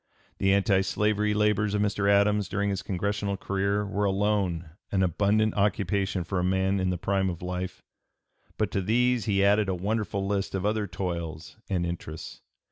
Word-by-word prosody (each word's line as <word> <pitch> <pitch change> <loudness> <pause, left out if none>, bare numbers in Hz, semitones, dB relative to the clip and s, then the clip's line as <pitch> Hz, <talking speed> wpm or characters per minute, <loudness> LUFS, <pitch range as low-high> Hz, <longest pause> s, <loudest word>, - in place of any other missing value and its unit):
The 95 - +3
anti 100 0 +3
slavery 105 +2 +1
labors 105 -1 +2
of 105 - +1
Mr. 100 0 +1
Adams 100 0 +3
during 100 0 0
his 95 -2 -2
Congressional 100 +2 -2
career 100 +2 -1
were 100 0 -1
alone 95 -5 0 0.2
an 95 -1 +2
abundant 105 +4 +2
occupation 100 -2 0
for 90 +2 -2
a - - 0
man 95 +1 +1
in 95 0 0
the 90 - -1
prime 95 +2 0
of 85 -1 -6
life; 90 0 -4 0.7
but - - 0
to 100 - 0
these 120 +2 +2
he 100 -2 +2
added 105 0 +3
a 95 - 0
wonderful 100 +1 -2
list 100 -1 -1
of 95 0 -2
other 105 0 0
toils 85 -2 -5
and 90 -3 0
interests. 85 -2 -6
100 Hz, 175 wpm, -27 LUFS, 95-105 Hz, 0.7 s, The